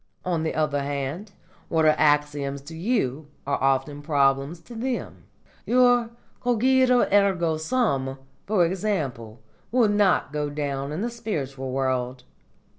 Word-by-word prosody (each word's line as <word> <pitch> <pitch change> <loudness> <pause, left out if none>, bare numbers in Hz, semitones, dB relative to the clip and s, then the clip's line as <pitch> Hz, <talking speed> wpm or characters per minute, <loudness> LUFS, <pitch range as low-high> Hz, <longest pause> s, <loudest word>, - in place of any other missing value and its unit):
On 175 -3 0
the 160 - -2
other 150 -2 0
hand, 140 +8 -4 0.4
what 160 -1 +2
are 155 - +6
axioms 145 -2 +1
to 155 +4 -10
you 160 - -1 0.2
are 140 0 -1
often 135 +2 0
problems 140 +1 +1
to 170 - -13
them. 245 +2 -4 0.4
Your 245 -1 +4 0.3
cogito 250 +1 +4
ergo 185 -6 +3
sum, 155 - 0 0.3
for 195 -4 +3
example, 145 - -3 0.3
will 235 -3 +4
not 205 -7 +2
go 150 -1 -1
down 140 -1 -3
in 155 +5 -3
the 235 +2 -2
spiritual 140 - -4
world. 130 -1 -1
155 Hz, 130 wpm, -25 LUFS, 140-210 Hz, 0.4 s, are